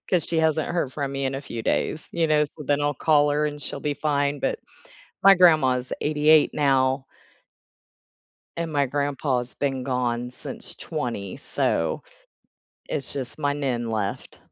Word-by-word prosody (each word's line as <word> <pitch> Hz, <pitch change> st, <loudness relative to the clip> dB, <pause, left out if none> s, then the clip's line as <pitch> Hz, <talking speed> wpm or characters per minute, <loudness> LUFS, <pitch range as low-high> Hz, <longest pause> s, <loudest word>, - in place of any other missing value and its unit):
'Cause 180 Hz, -5 st, +3 dB
she 165 Hz, -, 0 dB
hasn't 160 Hz, -1 st, +1 dB
heard 170 Hz, -7 st, -1 dB
from 140 Hz, -1 st, -3 dB
me 135 Hz, 0 st, -2 dB
in 135 Hz, 0 st, -1 dB
a 135 Hz, -, -3 dB
few 115 Hz, -4 st, -6 dB
days, 155 Hz, -, -1 dB
you 165 Hz, -1 st, +1 dB
know, 150 Hz, -1 st, +4 dB
so 150 Hz, +1 st, -9 dB
then 145 Hz, +1 st, +1 dB
I'll 145 Hz, 0 st, 0 dB
call 150 Hz, +1 st, +3 dB
her 150 Hz, +1 st, +1 dB
and 150 Hz, 0 st, -5 dB
she'll 140 Hz, -, -3 dB
be 145 Hz, 0 st, -1 dB
fine, 145 Hz, -1 st, 0 dB
but -, -, -2 dB, 0.6 s
my 195 Hz, 0 st, +8 dB
grandma's 135 Hz, -8 st, +4 dB
88 150 Hz, +1 st, +4 dB
now 135 Hz, -2 st, +2 dB, 1.5 s
and 165 Hz, -1 st, -3 dB
my 140 Hz, -1 st, +2 dB
grandpa's 135 Hz, -2 st, -1 dB
been 135 Hz, -2 st, -2 dB
gone 125 Hz, -2 st, -1 dB
since 145 Hz, +7 st, -2 dB
20 120 Hz, -, -4 dB
so 140 Hz, -, -1 dB, 0.9 s
it's 140 Hz, -, 0 dB
just 130 Hz, +1 st, -4 dB
my 145 Hz, -1 st, +1 dB
Nin 130 Hz, -5 st, -2 dB
left. 105 Hz, -3 st, -4 dB
145 Hz, 160 wpm, -24 LUFS, 130-150 Hz, 1.5 s, my